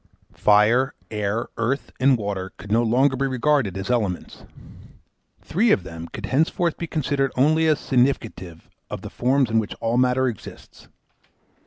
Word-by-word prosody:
Fire, 110 +6 +3 0.2
air, 105 +1 -2
earth, 125 +5 -2
and 130 0 +4
water, 100 -3 -4
could 100 +2 -10
no 115 +2 +4
longer 130 +4 +2
be 135 +1 0
regarded 130 -6 +1
as 95 +5 -3
elements. 105 -7 -2 1.0
Three 220 +8 +1
of 95 - +3
them 80 -1 -8
could 105 - -7
henceforth 160 - +1
be 170 - -5
considered 140 -3 -1
only 155 +5 +3
as 155 -2 +3
significative 115 - -1 0.3
of - - -6
the - - -7
forms 130 -1 +1
in 110 - +3
which 110 - -4
all 115 +1 -1
matter 125 +1 +2
exists. 115 -5 -9
125 Hz, 155 wpm, -23 LUFS, 105-135 Hz, 1.0 s, and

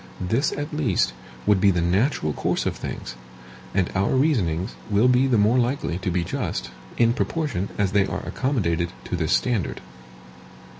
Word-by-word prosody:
This, 115 +10 +1
at 145 +1 -5
least, 125 - +1 0.3
would 100 -2 +3
be 100 - +6
the 90 -2 +2
natural 85 - +1
course - - -1
of - - -1
things; 65 - -6 0.6
and 95 -2 0
our 100 0 +1
reasonings 100 - +1 0.2
will 105 +4 +4
be 125 +1 +4
the 125 -3 +3
more 110 +5 +4
likely 120 -8 -1
to 95 - -2
be 90 0 0
just, 60 -6 -3 0.3
in 115 -1 +4
proportion 145 - -2
as 100 -3 +1
they 100 -1 +3
are - - -4
accommodated 90 - 0
to - - -3
this - - -1
standard. 120 -8 0
105 Hz, 165 wpm, -24 LUFS, 90-125 Hz, 0.6 s, be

